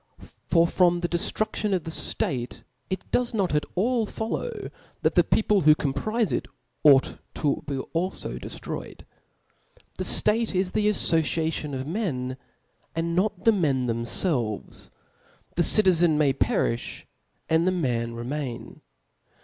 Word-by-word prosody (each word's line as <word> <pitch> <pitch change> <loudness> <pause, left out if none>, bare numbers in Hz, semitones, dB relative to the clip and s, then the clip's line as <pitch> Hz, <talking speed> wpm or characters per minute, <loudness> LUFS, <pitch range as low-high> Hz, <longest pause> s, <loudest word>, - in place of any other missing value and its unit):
For 165 -1 +4
from 175 0 +2
the 175 - 0
deftrudKon 210 +4 -1
of 180 - -2
the 165 - -5
ftate 125 -6 -1 0.3
it 190 - -5
does 245 -2 +1
not 195 -6 0
at 150 - 0
all 225 +3 +1
follow, 335 - -4 0.3
that - - +3
the - - +5
people 210 -2 +2
who 155 0 +6
compofe 205 - -1
it - - -2 0.4
ought 140 -3 +5 0.2
to 145 -2 0
be 140 - -2
alfo 170 +7 -3
deftroy - - -6
ed. - - -16 0.9
The - - 0
ftate 215 -1 +2
is 185 0 +1
the 210 0 +2
affociation 160 -5 0
of 130 0 -4
men, 140 - -3 0.6
and 170 +1 -1
not 195 +1 0
the 225 - +7
men 140 -10 +1
thcmfelves; 115 - -1 0.7
the 175 - +2
citizen 175 -4 +4
may 145 -3 +3
perifh, 120 -3 -1 0.4
and 160 +2 +2
the - - +4
man 120 -9 -1
remain. 125 +1 -5
165 Hz, 140 wpm, -25 LUFS, 135-195 Hz, 0.9 s, the